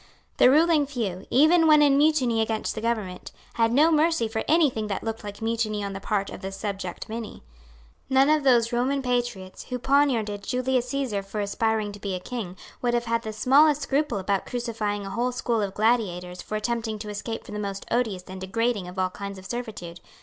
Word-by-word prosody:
The - - +7
ruling 305 0 +4
few, 220 -10 -4
even 320 +5 +5
when 300 -1 +7
in 280 -2 +5
mutiny 275 -6 +3
against 220 0 -1
the 215 - -5
government, 215 -6 -3 0.2
had 230 -1 +2
no 300 +7 +5
mercy 315 -6 +2
for 220 0 -3
any 320 0 +5
thing 220 -2 -3
that 200 - -3
looked 225 0 -4
like 205 +1 -7
mutiny 220 -2 -1
on 200 0 -4
the 195 - -5
part 200 0 -1
of - - -8
the 190 -1 -5
subject 195 -2 -5
many. 225 - -7 0.7
None 265 +1 +5
of 305 -1 +3
those 240 -3 +3
Roman 265 +3 0
patriots, 240 -7 -2
who 250 - -4
poniarded 245 -6 +1
Julius 250 +1 -1
Caesar 260 -8 -1
for 195 +2 -6
aspiring 215 +1 0
to 205 - -11
be 195 -2 -3
a - - -4
king, 195 -3 -6 0.2
would 240 -1 +1
have 240 0 0
had 230 0 0
the 220 - -5
smallest 285 +6 +4
scruple 285 -4 0
about 195 0 -1
crucifying 220 -4 -3
a 195 - -6
whole 240 +4 0
school 240 -2 -1
of 195 -1 -3
gladiators 185 -6 0
for 215 - -5
attempting 220 0 -2
to 210 0 -7
escape 215 +2 -5
from - - -10
the 210 - -4
most 200 -1 -4
odious 220 -7 0
and 185 0 -9
degrading 215 0 -1
of 180 +1 -10
all 185 -1 0
kinds 200 0 -7
of 190 - -12
servitude. 205 -8 -6
225 Hz, 210 wpm, -25 LUFS, 200-250 Hz, 0.7 s, The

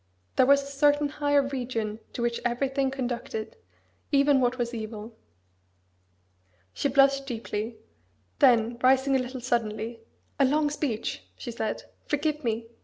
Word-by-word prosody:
There 255 - +5
was 280 0 +5
a 280 - -9
certain 290 +1 +3
higher 290 -1 +2
region 245 -5 -3
to 240 - -3
which 235 0 0
everything 270 +3 0
conducted 245 - -4 0.6
even 280 -1 +4
what 250 +1 +1
as 240 0 -1
evil." 220 0 -6 1.6
She - - 0
blushed 275 0 +4
deeply: 225 -2 -4 0.6
then 235 -1 +4
rising 265 +1 +4
a - - +4
little 255 0 -5
suddenly, 230 -2 -2 0.4
"A 275 - +6
long 295 +2 +2
speech!" 260 -7 -2
she 240 - -6
said: 220 -1 -3 0.2
"Forgive 300 0 -1
me! 230 -1 -2
255 Hz, 135 wpm, -27 LUFS, 235-275 Hz, 1.6 s, A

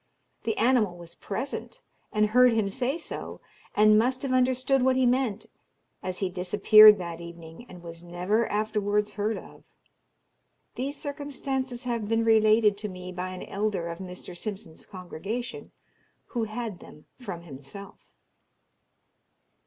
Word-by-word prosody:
The 225 -2 -1
animal 225 -7 +2
was 170 -1 -11
present, 265 - -5 0.3
and 215 0 +2
heard 250 +2 +6
him 215 -3 0
say 265 +7 -1
so, 335 - -7 0.4
and 215 0 +6
must 255 +4 +1
have 265 -2 -1
understood 255 +1 +2
what 260 0 +3
he 260 0 +3
meant, 245 -4 +1 0.6
as 185 -1 -4
he 190 - -1
disappeared 210 +3 +7
that 170 -2 -6
evening, 170 +5 -11
and 180 -1 -12
was 165 -1 -9
never 180 +6 0
afterwards 210 0 0
heard 210 +2 -1
of. - - -12 1.1
These 280 +3 -4
circumstances 270 -3 -4
have 235 -4 -2
been 225 0 +2
related 215 -2 +4
to 210 0 -4
me 180 -1 -8
by 180 +1 -4
an 185 0 -7
elder 200 -4 -2
of 170 - -6
Mr. 180 -1 -8
Simpson's 195 -3 -7
congregation, 195 +6 -6 0.6
who 235 -3 -1
had 215 -3 -5
them 150 - -15
from 190 -9 -7
himself. 165 +7 -12
210 Hz, 140 wpm, -27 LUFS, 180-245 Hz, 1.1 s, disappeared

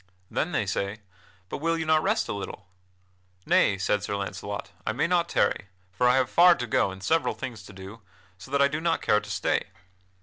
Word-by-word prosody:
Then - - -1
they - - 0
say: 100 +2 -3 0.5
"But - - -5
will 165 +2 0
you 160 - -2
not 155 0 +4
rest 215 +6 +1
a - - -2
little?" 100 -1 -7 0.8
"Nay," 100 - +3
said 100 +2 0
Sir 100 0 -3
Launcelot: 100 +1 -5
"I 110 - -1
may 140 +8 +1
not 170 0 +1
tarry, - - +1 0.3
for 125 +7 +3
I 125 - +4
have 130 -2 +3
far 175 +5 +6
to 125 - -3
go 110 - +2
and 95 0 -9
several 165 +11 +1
things 125 -5 -6
to - - -11
do, 95 +4 -10 0.3
so 95 +6 -13
that 140 +1 +3
I - - +6
do 150 +2 -3
not 165 0 0
care 105 - +4
to 105 0 -11
stay." 105 - 0
120 Hz, 215 wpm, -27 LUFS, 100-160 Hz, 0.8 s, far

